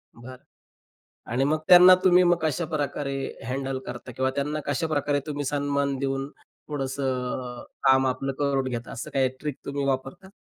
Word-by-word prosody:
बरं, 125 +2 -11 0.9
आणि 130 +3 +1
मग 155 +2 +1
त्यांना 180 0 +10
तुम्ही 180 0 +6
मग 175 0 +4
कशाप्रकारे 150 -3 -2 0.4
हँडल 135 0 -2
करता? 125 - -7
किंवा 130 +2 0
त्यांना 150 +2 -1
कशाप्रकारे 145 -2 0
तुम्ही 145 -1 -3
सन्मान 140 0 0
देऊन 135 0 -2 0.4
थोडंसं 135 -1 -3 0.6
अ, - - -14 0.2
काम 130 0 +5
आपलं 135 +1 -1
करून 135 -2 0
घेता? 120 -1 -5
असं 115 - -6
काही 135 -1 +3
ट्रिक 150 -3 -4
तुम्ही 140 0 -3
वापरता? 135 +8 -3
140 Hz, 150 wpm, -25 LUFS, 130-150 Hz, 0.9 s, त्यांना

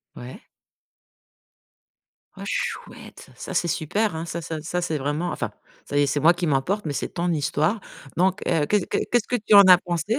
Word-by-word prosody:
Ouais. 130 - -10 2.0
Oh - - -8
chouette! - - -5
Ça, - - -7
c'est 175 - +1
super, 175 +5 -1
hein, 160 - -4
ça 170 0 -5
ça 160 -1 -5
ça 175 +3 -3
c'est 160 -3 -2
vraiment, 150 +5 -2
enfin, - - -3 0.3
ça 145 - -3
y 145 - +4
est, - - +1
c'est 145 +1 -1
moi 165 +4 +6
qui 175 0 -3
m'emporte, 155 +9 0
mais 150 - -2
c'est - - -3
ton 175 0 -2
histoire, 155 +6 0 0.3
donc 185 +2 +2
heu, 160 -4 +2
que 210 - +3
que - - -1
qu'est-ce 240 -2 +2
que 250 - 0
tu 215 -2 0
en 200 0 +10
as 185 -2 +8
pensé? 180 +5 -2
170 Hz, 200 wpm, -24 LUFS, 155-200 Hz, 2.0 s, en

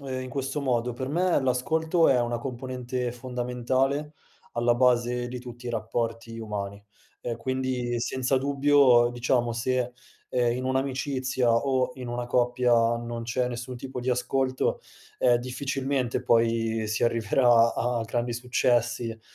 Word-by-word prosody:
ehm, 130 -2 -4
in 130 - -6
questo 135 +2 -3
modo: 125 -2 0
per 130 +2 -5
me 175 +2 +2
l'ascolto 160 +6 +2
è 125 -2 +4
una 120 0 -1
componente 125 0 -4
fondamentale 130 +4 -1 0.4
alla 120 0 +2
base 120 0 +2
di 125 0 -5
tutti 120 0 -11
i 120 - -3
rapporti 115 0 -3
umani. 100 -2 -5 0.4
Ehm, 120 -1 -3
quindi, 130 -1 -2
senza 130 +2 0
dubbio, 140 -3 +4
diciamo 120 -1 0
se, 125 +1 -1 0.4
ehm, 120 -1 +1
in 130 +1 -4
un'amicizia 130 -1 0
o 130 +1 +1
in 125 -2 -7
una 120 0 -3
coppia 125 0 +2 0.3
non 120 0 -5
c'è 125 +2 -1
nessun 120 +1 -6
tipo 130 +1 -7
di 125 +1 -1
ascolto, 130 +1 0 0.4
ehm, 120 -1 +4
difficilmente 130 0 -2
poi 115 -2 +2
si 110 +2 0
arriverà 115 0 +4
a 120 -1 0
grandi 120 +1 -2
successi, 120 -1 +1
e 115 0 -8
125 Hz, 145 wpm, -26 LUFS, 120-130 Hz, 0.4 s, è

